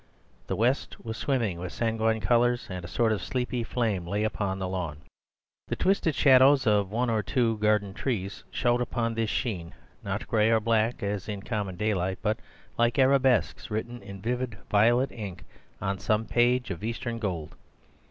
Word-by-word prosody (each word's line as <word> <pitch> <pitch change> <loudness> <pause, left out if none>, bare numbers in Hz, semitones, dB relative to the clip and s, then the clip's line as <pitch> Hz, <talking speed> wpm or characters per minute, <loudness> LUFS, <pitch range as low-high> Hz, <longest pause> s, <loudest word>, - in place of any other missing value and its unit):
The - - -1
west 125 +2 0
was 110 -1 -4
swimming 115 -10 -1
with 90 0 -5
sanguine 110 -1 0
colours, 120 +1 +2
and 90 -1 -5
a - - -6
sort 115 +4 +1
of 110 - -1
sleepy 125 -2 -2
flame 110 -7 -1
lay 105 +4 -1
along 100 -3 -2
the 95 -1 -3
lawn. 85 -5 -4 0.7
The - - -2
twisted 185 -6 +1
shadows 135 0 +6
of 105 -3 +3
the 105 - -7
one 120 0 +1
or 110 -1 +1
two 115 +1 0
garden 105 -2 +2
trees 100 -5 -3
showed 120 -1 +1
upon 115 -1 -1
this 115 -1 -1
sheen, 90 -10 -3 0.3
not - - -4
gray 110 -1 +3
or 115 -1 +4
black, 115 +1 +1
as 100 0 -3
in 100 -2 -4
common 105 -5 -3
daylight, 95 -2 0
but 110 0 0 0.4
like 120 +4 +3
arabesques 130 -4 +3
written 120 +3 -4
in 100 -1 -10
vivid 125 -2 -2
violet 120 +6 +4
ink 100 -6 -7 0.4
on 95 0 -2
some 110 +2 +1
page 120 0 +2
of 85 0 -6
Eastern 115 +1 -3
gold. 90 -8 -3
110 Hz, 175 wpm, -27 LUFS, 100-120 Hz, 0.7 s, shadows